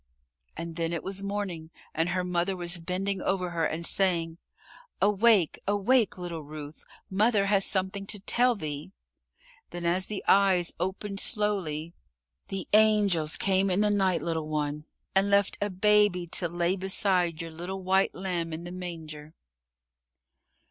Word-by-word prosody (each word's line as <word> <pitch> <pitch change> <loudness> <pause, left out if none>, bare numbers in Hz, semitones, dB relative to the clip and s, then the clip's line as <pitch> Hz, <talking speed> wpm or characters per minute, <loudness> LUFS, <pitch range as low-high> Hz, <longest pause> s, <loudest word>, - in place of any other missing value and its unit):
And 165 0 -6
then 165 0 -1
it 170 - -3
was 195 0 -3
morning 200 -5 -4 0.2
and 165 +2 0
her 180 0 -1
mother 180 +1 0
was 175 0 0
bending 185 +3 -2
over 185 -2 -1
her 165 -1 0
and 170 +1 -3
saying, 170 -4 +1 0.6
"Awake, 205 -3 +3
awake, 205 +3 +2
little 175 -3 -5
Ruth. 150 0 -9 0.2
Mother 205 +1 +2
has 195 -1 +4
something 195 0 -2
to 205 - -3
tell 245 +5 +3
thee." 150 - -6 0.8
Then 175 0 -6
as 180 +2 +2
the 210 -2 -4
eyes 190 -3 +4
opened 195 +2 -3
slowly 175 -8 0 0.5
"The 195 -1 -5
angels 205 -7 +3
came 195 0 +2
in 185 +2 +1
the 210 0 +3
night, 190 -6 +1
little 160 -2 -2
one, 150 0 -3 0.3
and 195 +1 +3
left 200 -1 +2
a 205 - 0
Baby 205 -1 +3
to 175 - -1
lay 175 +2 0
beside 185 -3 +1
your 165 -1 -5
little 180 +4 -6
white 190 +1 +2
lamb 175 -3 -3
in 160 +2 -6
the 175 - -7
manger." 160 -4 -8
185 Hz, 150 wpm, -28 LUFS, 165-200 Hz, 0.8 s, has